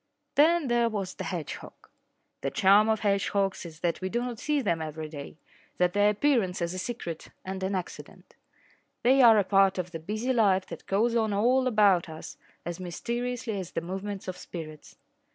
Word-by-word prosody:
Then 320 Hz, +1 st, +4 dB
there 240 Hz, -1 st, +2 dB
was 200 Hz, -4 st, -3 dB
the -, -, -6 dB
hedgehog. 170 Hz, -6 st, -6 dB, 0.5 s
The -, -, -1 dB
charm 205 Hz, +3 st, +5 dB
of 220 Hz, -1 st, +1 dB
hedgehogs 200 Hz, -2 st, 0 dB
is 160 Hz, -1 st, -13 dB
that 170 Hz, +1 st, -1 dB
we 185 Hz, -, -2 dB
do 235 Hz, -, -1 dB
not 245 Hz, -2 st, -4 dB
see 300 Hz, +1 st, 0 dB
them 170 Hz, -10 st, 0 dB
every 155 Hz, 0 st, -5 dB
day 150 Hz, 0 st, -9 dB, 0.4 s
that 180 Hz, 0 st, +2 dB
their 205 Hz, 0 st, +4 dB
appearance 210 Hz, -4 st, +1 dB
is 170 Hz, 0 st, -2 dB
a 185 Hz, -, -4 dB
secret 185 Hz, -8 st, -5 dB, 0.2 s
and 190 Hz, 0 st, -5 dB
an 190 Hz, +1 st, -1 dB
accident. 180 Hz, -2 st, -8 dB, 0.7 s
They 265 Hz, +3 st, +5 dB
are 230 Hz, -3 st, +8 dB
a 205 Hz, -, +4 dB
part 195 Hz, 0 st, +3 dB
of 180 Hz, -1 st, -3 dB
the 165 Hz, -, -5 dB
busy 215 Hz, +10 st, -2 dB
life 195 Hz, -5 st, +3 dB
that -, -, -9 dB
goes 230 Hz, +5 st, +1 dB
on 220 Hz, -2 st, +1 dB
all 250 Hz, +6 st, +3 dB
about 205 Hz, -7 st, +4 dB
us 160 Hz, 0 st, -9 dB, 0.3 s
as 175 Hz, +1 st, -5 dB
mysteriously 235 Hz, +5 st, -3 dB
as 180 Hz, -2 st, -7 dB
the 165 Hz, -, -1 dB
movements 195 Hz, +3 st, -5 dB
of 185 Hz, -, -4 dB
spirits. 155 Hz, -3 st, -9 dB
195 Hz, 190 wpm, -28 LUFS, 180-235 Hz, 0.7 s, are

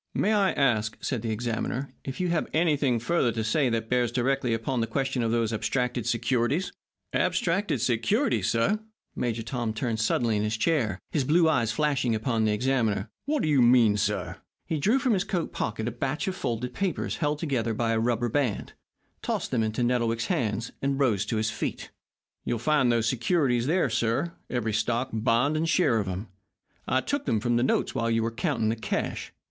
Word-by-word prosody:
"May 215 Hz, -, +2 dB
I 200 Hz, -2 st, +3 dB
ask," 110 Hz, -6 st, +1 dB
said 125 Hz, -5 st, -2 dB
the 115 Hz, -, -3 dB
examiner, 115 Hz, +4 st, -3 dB
"if 135 Hz, -, -6 dB
you 180 Hz, -1 st, 0 dB
have 170 Hz, -2 st, 0 dB
anything 150 Hz, -6 st, +2 dB
further 125 Hz, +1 st, +1 dB
to 110 Hz, 0 st, -2 dB
say 125 Hz, +5 st, +2 dB
that 115 Hz, -1 st, -1 dB
bears 125 Hz, -1 st, +1 dB
directly 130 Hz, 0 st, 0 dB
upon 115 Hz, +2 st, -1 dB
the 115 Hz, -, 0 dB
question 135 Hz, -1 st, -1 dB
of 115 Hz, -, 0 dB
those 115 Hz, -1 st, 0 dB
abstracted 120 Hz, +2 st, -1 dB
securities?" 125 Hz, -, 0 dB, 0.4 s
"Abstracted 200 Hz, 0 st, +1 dB
securities, 165 Hz, -, +1 dB
sir!" 115 Hz, -, +1 dB, 0.4 s
Major 115 Hz, -2 st, -2 dB
Tom 115 Hz, -2 st, -3 dB
turned 110 Hz, 0 st, -2 dB
suddenly 110 Hz, 0 st, +1 dB
in -, -, 0 dB
his 105 Hz, +1 st, -1 dB
chair, 115 Hz, -, +1 dB
his 145 Hz, -, +1 dB
blue 160 Hz, +5 st, +4 dB
eyes 120 Hz, -8 st, +2 dB
flashing 130 Hz, -2 st, +1 dB
upon 110 Hz, 0 st, 0 dB
the 105 Hz, -, +2 dB
examiner. 115 Hz, -2 st, 0 dB
"What 295 Hz, 0 st, 0 dB
do -, -, +1 dB
you 145 Hz, -4 st, +4 dB
mean, 120 Hz, -3 st, +5 dB
sir?" 100 Hz, -4 st, -1 dB, 0.3 s
He 160 Hz, -3 st, -2 dB
drew 210 Hz, -, +3 dB
from 260 Hz, -3 st, +1 dB
his 190 Hz, -2 st, +1 dB
coat 175 Hz, -4 st, -3 dB
pocket 110 Hz, +1 st, -2 dB
a -, -, -1 dB
batch 135 Hz, -, -2 dB
of 190 Hz, -, -1 dB
folded 120 Hz, -5 st, -3 dB
papers 195 Hz, -3 st, -2 dB
held 150 Hz, -1 st, 0 dB
together 125 Hz, -8 st, -1 dB
by 115 Hz, +1 st, 0 dB
a 115 Hz, -, +1 dB
rubber 120 Hz, +1 st, +1 dB
band, 125 Hz, -3 st, -1 dB, 0.5 s
tossed -, -, -2 dB
them 120 Hz, -, +1 dB
into 110 Hz, +2 st, -1 dB
Nettlewick's 115 Hz, -2 st, +1 dB
hands, 110 Hz, -1 st, -1 dB
and 140 Hz, 0 st, 0 dB
rose 110 Hz, -8 st, +2 dB
to 110 Hz, -, -1 dB
his 110 Hz, +1 st, 0 dB
feet. 105 Hz, -, -4 dB, 0.5 s
"You'll 120 Hz, -, -1 dB
find 135 Hz, 0 st, +2 dB
those 115 Hz, -1 st, +1 dB
securities 125 Hz, 0 st, +1 dB
there, 175 Hz, +4 st, +2 dB
sir, 120 Hz, +9 st, 0 dB, 0.2 s
every 115 Hz, -3 st, -1 dB
stock, 120 Hz, +4 st, 0 dB
bond, 120 Hz, +6 st, +2 dB
and 160 Hz, +1 st, 0 dB
share 150 Hz, -9 st, +3 dB
of 100 Hz, -, -2 dB
'em. 95 Hz, +4 st, -4 dB, 0.6 s
I 130 Hz, -, +2 dB
took 285 Hz, -, -2 dB
them 110 Hz, -, +2 dB
from 120 Hz, +1 st, +1 dB
the -, -, +2 dB
notes 130 Hz, -, +1 dB
while 115 Hz, 0 st, 0 dB
you 115 Hz, 0 st, +1 dB
were 115 Hz, -, -1 dB
counting 115 Hz, -3 st, 0 dB
the 115 Hz, -, 0 dB
cash. 110 Hz, -, -3 dB
120 Hz, 195 wpm, -27 LUFS, 115-145 Hz, 0.6 s, mean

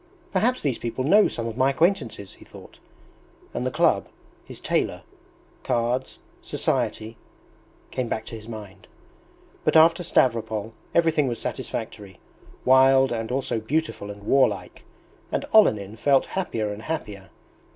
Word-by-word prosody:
"Perhaps 235 Hz, +7 st, +1 dB
these 135 Hz, -5 st, -1 dB
people 120 Hz, +2 st, -3 dB
know 205 Hz, +10 st, +5 dB
some 115 Hz, -, -4 dB
of 115 Hz, -1 st, -4 dB
my 130 Hz, +2 st, +3 dB
acquaintances," 140 Hz, -, 0 dB
he -, -, -16 dB
thought; -, -, -15 dB, 0.7 s
and 125 Hz, +1 st, -2 dB
the -, -, +1 dB
club, -, -, +2 dB, 0.4 s
his -, -, -11 dB
tailor, -, -, -1 dB, 0.6 s
cards, 120 Hz, +2 st, -1 dB, 0.2 s
society... 110 Hz, +1 st, -2 dB, 0.7 s
came 130 Hz, -2 st, -2 dB
back 110 Hz, -1 st, -3 dB
to 115 Hz, -, -8 dB
his 110 Hz, 0 st, -10 dB
mind. 105 Hz, -4 st, -10 dB, 0.8 s
But -, -, +1 dB
after 165 Hz, +2 st, +6 dB
Stavropol 115 Hz, -8 st, 0 dB, 0.2 s
everything 160 Hz, -4 st, +3 dB
was 120 Hz, -2 st, -2 dB
satisfactory 95 Hz, -3 st, -6 dB, 0.5 s
wild 130 Hz, 0 st, +5 dB
and 115 Hz, 0 st, -3 dB
also 130 Hz, -3 st, -1 dB
beautiful 130 Hz, -3 st, -2 dB
and 100 Hz, 0 st, -9 dB
warlike, 105 Hz, -7 st, +1 dB, 0.5 s
and -, -, -1 dB
Olenin 110 Hz, -, +4 dB
felt 140 Hz, +2 st, +3 dB
happier 115 Hz, -, -2 dB
and 105 Hz, -, -9 dB
happier. 105 Hz, -, -5 dB
120 Hz, 135 wpm, -24 LUFS, 110-140 Hz, 0.8 s, after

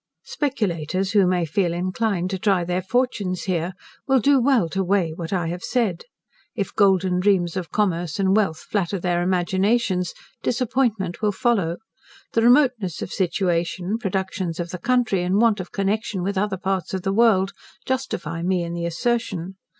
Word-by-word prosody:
Speculators 195 Hz, -, -1 dB
who 200 Hz, -3 st, +4 dB
may 180 Hz, -2 st, +1 dB
feel 170 Hz, +2 st, 0 dB
inclined 185 Hz, +1 st, -1 dB
to 190 Hz, -, -2 dB
try 195 Hz, -3 st, +2 dB
their 180 Hz, +1 st, -1 dB
fortunes 200 Hz, -3 st, -1 dB
here, 180 Hz, -1 st, -1 dB, 0.3 s
will 265 Hz, -1 st, +4 dB
do 275 Hz, +2 st, +4 dB
well 245 Hz, -8 st, +3 dB
to 190 Hz, +4 st, -1 dB
weigh 185 Hz, -3 st, +1 dB
what 165 Hz, 0 st, -6 dB
I 175 Hz, -4 st, 0 dB
have 175 Hz, +1 st, -4 dB
said. 215 Hz, -9 st, -1 dB, 0.5 s
If 200 Hz, -4 st, -3 dB
golden 190 Hz, -3 st, +3 dB
dreams 180 Hz, -3 st, +2 dB
of 180 Hz, -3 st, -4 dB
commerce 175 Hz, -5 st, -1 dB
and 190 Hz, 0 st, +3 dB
wealth 190 Hz, -7 st, +1 dB
flatter 195 Hz, -2 st, -1 dB
their 175 Hz, -1 st, 0 dB
imaginations, 185 Hz, +1 st, +1 dB, 0.3 s
disappointment 230 Hz, -7 st, 0 dB
will 210 Hz, -1 st, +2 dB
follow: 195 Hz, -6 st, 0 dB, 0.6 s
the 230 Hz, -, +3 dB
remoteness 240 Hz, -, +3 dB
of -, -, -7 dB
situation, 180 Hz, +2 st, -1 dB
productions 190 Hz, -4 st, -2 dB
of 170 Hz, 0 st, -3 dB
the 180 Hz, -, -5 dB
country, 240 Hz, -3 st, +1 dB
and 185 Hz, +3 st, +1 dB
want 225 Hz, -3 st, +3 dB
of 185 Hz, -, -6 dB
connection 200 Hz, -1 st, -1 dB
with 200 Hz, +2 st, -1 dB
other 195 Hz, 0 st, 0 dB
parts 190 Hz, -1 st, -2 dB
of 185 Hz, -, -4 dB
the 195 Hz, 0 st, 0 dB
world, 195 Hz, -3 st, +3 dB, 0.3 s
justify 175 Hz, -, -3 dB
me 180 Hz, 0 st, +1 dB
in 170 Hz, 0 st, -4 dB
the 170 Hz, 0 st, -2 dB
assertion. 190 Hz, -2 st, -2 dB
190 Hz, 165 wpm, -23 LUFS, 175-215 Hz, 0.6 s, who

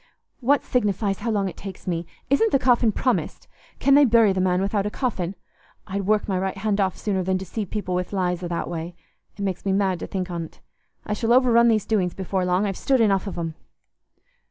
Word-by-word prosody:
"What 275 Hz, +2 st, +2 dB
signifies 205 Hz, -4 st, 0 dB
how 230 Hz, -, -3 dB
long 205 Hz, -3 st, +1 dB
it 185 Hz, -, -6 dB
takes 195 Hz, -1 st, -9 dB
me? 170 Hz, -2 st, -2 dB, 0.2 s
Isn't 435 Hz, -, +3 dB
the -, -, +5 dB
coffin 245 Hz, -3 st, +3 dB
promised? 250 Hz, +4 st, -1 dB, 0.3 s
Can 275 Hz, -, +3 dB
they 290 Hz, +1 st, +7 dB
bury 230 Hz, -5 st, +5 dB
the 190 Hz, -, 0 dB
man 180 Hz, -1 st, +2 dB
without 200 Hz, +1 st, 0 dB
a -, -, -1 dB
coffin? 200 Hz, -7 st, -2 dB, 0.5 s
I'd 195 Hz, -1 st, -4 dB
work 215 Hz, 0 st, +2 dB
my 190 Hz, -3 st, 0 dB
right 190 Hz, +1 st, -2 dB
hand 205 Hz, 0 st, 0 dB
off 190 Hz, -3 st, 0 dB
sooner 195 Hz, -3 st, -1 dB
than 185 Hz, +1 st, 0 dB
deceive 190 Hz, +2 st, -5 dB
people 205 Hz, -4 st, -3 dB
with 180 Hz, 0 st, -2 dB
lies 180 Hz, -3 st, -1 dB
i' -, -, -2 dB
that 170 Hz, -1 st, -3 dB
way. 170 Hz, +1 st, -5 dB, 0.4 s
It 200 Hz, -, -4 dB
makes 190 Hz, -3 st, -2 dB
me 195 Hz, -, 0 dB
mad 190 Hz, -3 st, +1 dB
to -, -, -5 dB
think 185 Hz, -2 st, -4 dB
on't. 170 Hz, -2 st, -6 dB, 0.5 s
I 210 Hz, -, -2 dB
shall 225 Hz, +2 st, -1 dB
overrun 240 Hz, -2 st, +5 dB
these 220 Hz, -3 st, +2 dB
doings 185 Hz, -6 st, 0 dB
before 190 Hz, -1 st, -2 dB
long. 180 Hz, +3 st, +1 dB
I've 195 Hz, -2 st, -2 dB
stood 270 Hz, -2 st, +1 dB
enough 200 Hz, -3 st, +2 dB
of 190 Hz, -, -5 dB
'em." 165 Hz, -2 st, -3 dB
195 Hz, 220 wpm, -24 LUFS, 185-220 Hz, 0.5 s, they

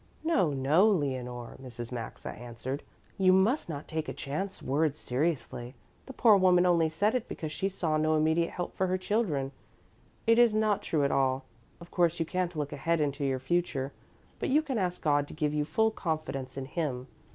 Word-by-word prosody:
"No, 315 Hz, -, +2 dB
no, 145 Hz, +10 st, +4 dB
Leonore," 130 Hz, -, -2 dB
Mrs. 120 Hz, -2 st, -8 dB
Maxa 115 Hz, -2 st, -6 dB
answered, 120 Hz, +3 st, -6 dB, 0.4 s
"you 185 Hz, -1 st, +5 dB
must 190 Hz, -, +3 dB
not 145 Hz, -2 st, -5 dB
take 160 Hz, -1 st, -3 dB
a -, -, -5 dB
chance 190 Hz, +8 st, -4 dB
word 150 Hz, +2 st, 0 dB
seriously. 130 Hz, -3 st, -2 dB, 0.3 s
The 265 Hz, -, -8 dB
poor 225 Hz, -4 st, +6 dB
woman 180 Hz, -1 st, +5 dB
only 170 Hz, -3 st, +4 dB
said 200 Hz, +7 st, +1 dB
it 250 Hz, -3 st, -1 dB
because 155 Hz, -2 st, -5 dB
she 195 Hz, +4 st, -1 dB
saw 165 Hz, -5 st, -1 dB
no 155 Hz, 0 st, +2 dB
immediate 160 Hz, +2 st, +2 dB
help 175 Hz, -1 st, -5 dB
for 190 Hz, -, +1 dB
her 185 Hz, +1 st, +1 dB
children. 185 Hz, -, 0 dB, 0.7 s
It 230 Hz, +1 st, +5 dB
is 235 Hz, -3 st, +5 dB
not 215 Hz, -2 st, +2 dB
true 150 Hz, -3 st, 0 dB
at 140 Hz, -, +2 dB
all. 130 Hz, 0 st, +1 dB, 0.3 s
Of 170 Hz, 0 st, -13 dB
course 175 Hz, -1 st, +2 dB
you 165 Hz, -, +1 dB
can't 180 Hz, 0 st, -2 dB
look 150 Hz, -2 st, -3 dB
ahead 165 Hz, 0 st, 0 dB
into 145 Hz, -1 st, -1 dB
your 135 Hz, -1 st, +1 dB
future, 135 Hz, -1 st, -1 dB, 0.5 s
but -, -, -1 dB
you 300 Hz, +4 st, +4 dB
can 265 Hz, -7 st, -2 dB
ask 180 Hz, -2 st, -2 dB
God 145 Hz, -1 st, +2 dB
to -, -, -10 dB
give 150 Hz, -1 st, 0 dB
you 150 Hz, -1 st, 0 dB
full 220 Hz, +9 st, +2 dB
confidence 155 Hz, -8 st, -4 dB
in 135 Hz, -, -3 dB
Him. 135 Hz, -4 st, -3 dB
160 Hz, 195 wpm, -29 LUFS, 135-185 Hz, 0.7 s, poor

